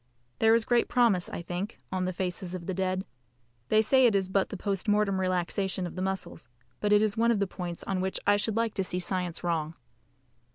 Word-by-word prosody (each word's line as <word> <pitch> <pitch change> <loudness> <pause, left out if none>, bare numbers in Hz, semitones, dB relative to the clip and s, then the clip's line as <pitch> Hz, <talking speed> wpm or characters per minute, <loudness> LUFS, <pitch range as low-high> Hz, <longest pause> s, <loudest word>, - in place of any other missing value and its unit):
There 225 0 +5
is 230 -1 +2
great 240 -1 +2
promise, 230 -8 +2
I 170 - -5
think, 180 +6 -5
on 185 -1 -1
the 185 - -1
faces 180 0 -4
of 175 -2 -7
the 190 - -2
dead. 185 +1 -1 0.6
They 215 0 +4
say 260 +2 +5
it 220 - +2
is 190 -1 +1
but 190 0 +1
the 200 - -5
post 195 0 -2
mortem 205 -2 +2
relaxation 185 +1 -1
of 175 - -7
the 185 - -4
muscles, 190 -7 -4 0.3
but 210 - 0
it 210 0 +6
is 215 -1 0
one 230 +1 +3
of 235 - +3
the 200 - +2
points 180 -2 -6
on 190 -1 -2
which 190 0 -1
I 205 - +5
should 205 +1 -1
like 230 -1 +1
to 195 - -1
see 180 - -2
science 180 -2 -3
wrong. 165 -2 -1
190 Hz, 230 wpm, -28 LUFS, 180-210 Hz, 0.6 s, it